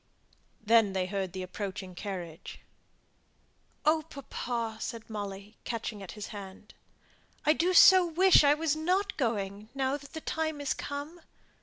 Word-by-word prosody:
Then 220 -2 +4
they 190 -1 0
heard 190 -1 -3
the 185 0 -5
approaching 190 0 -6
carriage. 175 -4 -7 1.2
"Oh, 310 +1 +3
papa," 235 -5 -4
said 230 -1 -5
Molly, 205 0 -6
catching 225 -3 -4
at 195 - -8
his 210 -1 -7
hand, 200 0 -10 0.7
"I 305 - +6
do 345 +4 +1
so 370 0 +8
wish 360 +1 +6
I 290 0 +5
wasn't 325 +6 0
going, 210 -4 -2
now 270 +1 0
that 280 -1 -15
the 320 - -6
time 315 -1 -2
is 285 -1 0
come." 290 +4 -6
230 Hz, 140 wpm, -30 LUFS, 200-310 Hz, 1.2 s, so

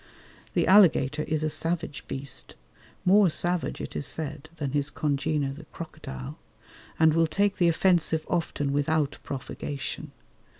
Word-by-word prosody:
The - - +3
alligator 160 -7 +5
is 155 -1 0
a 155 - +1
savage 165 -4 -1
beast, 135 - -5 0.5
more 195 +1 +6
savage 175 +2 0
it - - -7
is - - 0
said 155 -1 -3
than 145 -4 -3
his 145 +1 +1
congener 145 -1 -1
the 150 +3 -11
crocodile, 65 - -8 0.6
and 160 -1 +5
will 165 0 +3
take 200 +4 +1
the 175 - +4
offensive 165 -2 +2
often 145 -5 -1
without 145 0 0
provocation. 140 +1 -5
155 Hz, 135 wpm, -27 LUFS, 140-170 Hz, 0.6 s, more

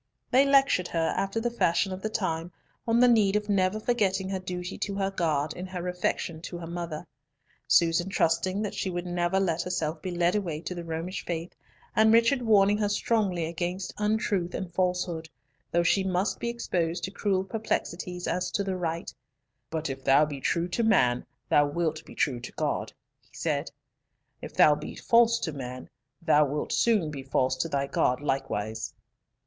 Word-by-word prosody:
They 270 +2 +5
lectured 275 -10 +4
her, 165 -1 0
after 195 +3 -1
the 240 +1 -1
fashion 190 -4 +1
of 185 - -7
the 215 - -2
time, 175 -5 -2 0.4
on 230 +1 +3
the 250 - +7
need 210 -4 +4
of 210 0 -1
never 195 +1 +2
forgetting 200 -5 0
her 190 -1 -2
duty 180 0 -5
to 200 - -2
her 195 0 0
God 155 -5 0
in 180 +1 -6
her 180 -1 -5
affection 180 -2 -2
to 175 - -6
her 170 - -7
mother, 170 -2 -5 0.6
Susan 170 +2 +3
trusting 185 +3 +1
that 210 - -3
she 190 - -2
would 175 0 -3
never 175 +1 0
let 170 -3 +1
herself 160 -3 -2
be 185 - -4
led 175 +1 +1
away 175 -7 -2
to 180 - -5
the 175 -1 -6
Romish 165 +3 -4
faith, 170 0 -4 0.4
and 220 0 +5
Richard 230 +4 +4
warning 210 -2 +4
her 205 -1 +1
strongly 205 -5 +1
against 175 +3 -3
untruth 210 -4 0
and 180 -3 -5
falsehood, 180 -3 -1 0.4
though 170 0 +2
she 190 +3 +3
must 190 +2 0
be 235 - -2
exposed 175 -7 -2
to 190 - -3
cruel 195 -2 0
perplexities 180 -4 -3
as 180 0 -1
to 200 - -1
the 190 -1 -2
right— 170 -2 -3 0.6
"But 160 0 -2
if 135 0 -5
thou 140 +3 +5
be 145 -3 -6
true 170 +5 0
to 175 - -1
man, 125 - +3 0.2
thou 145 0 +4
wilt 160 +1 -2
be - - -12
true 130 -4 0
to 125 - -8
God," - - -2 0.3
he - - -25
said. - - -1 0.7
"If - - -8
thou 150 - +7
be 150 +1 -6
false 235 0 +4
to 160 - -2
man, 130 -2 -7 0.3
thou 150 -2 +5
wilt 150 +2 -2
soon 210 -10 +2
be 140 -2 -6
false 130 -1 +1
to 165 +6 -1
thy 140 -2 0
God 125 -2 +1
likewise." 110 -6 -3
180 Hz, 185 wpm, -28 LUFS, 160-200 Hz, 0.7 s, the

